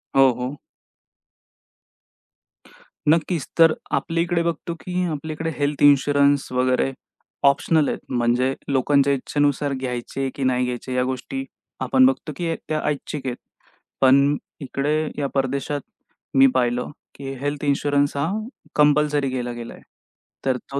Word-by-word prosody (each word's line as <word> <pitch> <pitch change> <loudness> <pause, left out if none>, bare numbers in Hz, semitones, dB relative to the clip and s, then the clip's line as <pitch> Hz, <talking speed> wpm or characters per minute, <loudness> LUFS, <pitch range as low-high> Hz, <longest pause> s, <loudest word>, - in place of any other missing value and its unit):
हो, 135 -1 +7
हो. 125 +3 -3 2.5
नक्कीच. 165 -1 +2
तर 165 -1 +7 0.2
आपल्याकडे 170 +1 0
बघतो, 170 0 -2
की 180 0 -2
आपल्याकडे 155 +2 -4
हेल्थ 145 0 -1
इन्शुरन्स 145 0 +4
वगैरे 130 +1 +1 0.6
ऑप्शनल 150 +2 +2
म्हणजे 125 +1 +1 0.2
लोकांच्या 140 +1 +3
इच्छेनुसार 145 +1 0
घ्यायचे, 130 +1 -3
की 140 - -3
नाही 125 -1 +2
घ्यायचे 125 +1 -4
या 125 0 +2
गोष्टी 130 - -4 0.4
आपण 260 - +4
बघतो 260 - +1
की 170 -2 -2
त्या 155 -1 -3
ऐच्छिक 145 -1 -3
आहेत. 125 - -2 0.7
पण 140 +2 +5 0.2
इकडे 140 +2 -1 0.2
या 145 - 0
परदेशात 140 +2 -1 0.6
मी 135 0 +8
पाहिलं, 125 0 0 0.2
की 135 -1 -6
हेल्थ 145 +1 -3
इन्शुरन्स 145 0 +1
हा 140 - 0 0.5
कंपल्सरी 150 -1 +3
केला 125 -1 -3
गेला. 120 -1 -8 0.7
तर 130 -1 +2
तो 140 - -1
140 Hz, 120 wpm, -22 LUFS, 130-150 Hz, 2.5 s, मी